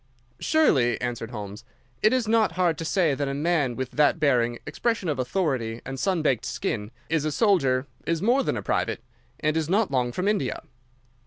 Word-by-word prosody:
"Surely," 140 - +3
answered 120 -2 -3
Holmes, 105 -2 -7 0.4
"it 215 - +5
is 255 -3 +1
not 220 -5 +3
hard 175 -2 +2
to - - -3
say 170 -3 +2
that 140 +1 -2
a 135 - -2
man 145 -5 +1
with 130 0 -4
that 150 +3 +3
bearing, 120 -5 +2
expression 230 -6 -1
of 145 -4 -1
authority, 130 -5 -1
and 135 0 -5
sunbaked 155 - +1
skin, 105 -2 -3 0.2
is 160 -2 0
a 155 - -1
soldier, 140 - +2 0.2
is 165 -1 +1
more 240 +9 +3
than - - -1
a - - -5
private, - - -1 0.4
and 155 0 +1
is 160 -1 -1
not 205 0 +2
long 125 -2 +1
from 185 +9 -2
India." 205 -11 -1
150 Hz, 185 wpm, -25 LUFS, 125-185 Hz, 0.4 s, it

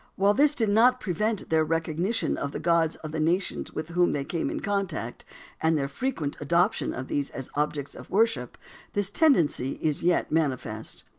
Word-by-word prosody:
While 200 +2 +3
this 290 +4 +4
did 225 -6 +1
not 245 +5 +5
prevent 210 0 -2
their 160 -1 +4
recognition 165 +7 0
of 140 - -4
the - - -3
gods 165 -1 +2
of 155 - -5
the 160 - -3
nations 170 +5 0
with 155 +1 -5
whom 175 +1 +2
they 140 - -1
came 165 +3 -2
in - - -3
contact, 190 - -3 0.4
and 160 0 +3
their 140 -2 -1
frequent 150 - -3
adoption 170 +7 +1
of 130 +1 -5
these 140 -1 -1
as 135 - -7
objects 145 -1 -2
of - - -11
worship, 190 - +1 0.4
this 200 -1 0
tendency 170 - +3
is 155 -2 -2
yet 175 +1 +1
manifest. 150 -5 -2
165 Hz, 180 wpm, -27 LUFS, 150-205 Hz, 0.4 s, not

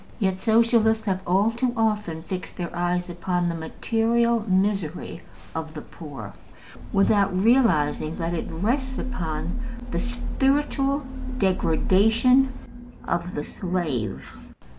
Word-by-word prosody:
Yet 190 -4 0
Socialists 225 0 +3
have 190 -2 0
all 195 +5 +3
too 240 +1 -1
often 210 -8 0
fixed 185 +1 -6
their 175 -1 -4
eyes 175 +1 0
upon 175 0 -1
the 170 - 0
material 230 +7 +1
misery 190 -3 0 0.3
of 160 -1 -5
the 150 - -6
poor 135 - -9 0.6
without 195 -1 +3
realizing 185 - +3
that 170 0 -2
it 170 - -3
rests 255 - -1
upon 175 -4 -3 0.3
the - - -1
spiritual 275 +3 0 0.3
degradation 220 +7 +3 0.6
of 170 +1 -2
the 145 - -2
slave. 155 - -3
190 Hz, 115 wpm, -25 LUFS, 170-230 Hz, 0.6 s, Socialists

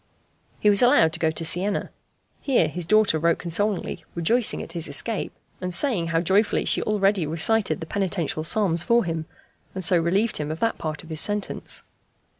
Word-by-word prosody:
He - - 0
was 205 -1 +5
allowed 165 -10 +4
to - - -2
go 160 - +2
to 160 +1 -4
Siena. 190 +5 0 0.5
Here 250 - +2
his 170 +2 -6
daughter 215 -5 +3
wrote 170 +1 +2
consolingly, 195 +4 -2
rejoicing 225 +8 +1
at - - -10
his 165 -2 -4
escape, 195 +9 0 0.3
and 180 0 -3
saying 185 - 0
how 165 0 0
joyfully 195 +5 +1
she - - +2
already 200 -5 +1
recited 165 +1 0
the - - -5
penitential 175 -4 -2
psalms 170 0 +1
for 235 +6 +2
him, 165 -1 -4 0.5
and 185 -2 -4
so 175 +1 +4
relieved 195 +7 0
him 150 -1 -4
of 160 +1 -5
that 230 0 -1
part 155 -2 -5
of 165 - -14
his 155 - +2
sentence. 205 -1 -2
175 Hz, 185 wpm, -24 LUFS, 160-210 Hz, 0.5 s, was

